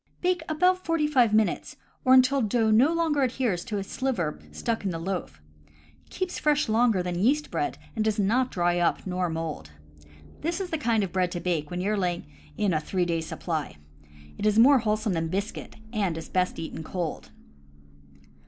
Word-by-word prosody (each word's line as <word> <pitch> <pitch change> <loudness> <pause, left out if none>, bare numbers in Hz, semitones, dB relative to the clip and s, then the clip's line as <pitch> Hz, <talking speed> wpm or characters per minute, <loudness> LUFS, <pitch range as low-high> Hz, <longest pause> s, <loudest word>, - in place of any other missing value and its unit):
Bake 360 -1 +1
about 365 +4 +2
forty 330 -2 +1
five 255 -7 +3
minutes, 215 0 +1 0.3
or 260 0 +6
until 260 +1 +5
no 220 0 +2 0.4
dough 290 - 0
adheres 240 -8 0
to 210 - -3
a 200 - -2
sliver 195 - -2
stuck 230 -2 -2
into 185 -4 -2
the 165 - -7
loaf. 180 - -4 0.7
Keeps 370 -1 -3
fresh 300 -1 +2
longer 220 -4 +3
than 175 -1 -3
yeast 285 +9 +2
bread, 360 0 -2 0.2
and 220 - 0
does 215 -1 0
not 235 +6 +2
dry 175 -1 +1
up 175 - +1
nor 180 -1 -1
mold. 160 - -5 0.7
This 335 +4 -2
is 375 -2 -4
the 320 - -1
kind 230 -6 +1
of 190 - -3
bread 180 -1 0
to 175 - -3
bake 165 -5 -1
when 180 0 -3
you 200 +3 0
are 215 - 0
laying 180 -3 -1 0.3
in 200 -4 +1
a 155 - +2
three 180 +3 -1
days' 165 -2 -2
supply. 155 - -4 0.6
It 210 - +1
is 210 0 +2
more 265 +4 +7
wholesome 215 -2 0
than 165 -1 -1
biscuit, 195 +5 -4 0.2
and 195 -7 0
is 165 - -7
best 185 0 0
eaten 160 0 -6
cold. 160 - -4
205 Hz, 190 wpm, -26 LUFS, 175-255 Hz, 0.7 s, more